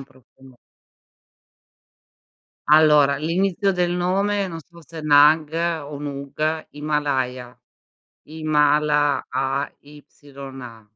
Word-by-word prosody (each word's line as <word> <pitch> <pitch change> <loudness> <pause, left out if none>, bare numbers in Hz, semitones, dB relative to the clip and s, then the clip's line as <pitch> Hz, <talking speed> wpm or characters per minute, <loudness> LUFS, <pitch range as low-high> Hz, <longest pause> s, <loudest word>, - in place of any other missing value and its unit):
un - - -10
profumo 130 -1 -21 2.1
Allora, 150 -2 +5
l'inizio 185 +5 0
del 180 -1 0
nome, 195 +3 0
non 165 - -7
so 170 +2 -16
se 165 +1 -12
è - - -7
nag 150 +1 +4 0.3
o 145 -1 -8
nug, 145 +2 -4
Himalaya. 135 -5 -3 0.7
Himala 150 -1 +1
AYA 135 -3 -7
150 Hz, 90 wpm, -21 LUFS, 140-160 Hz, 2.1 s, Allora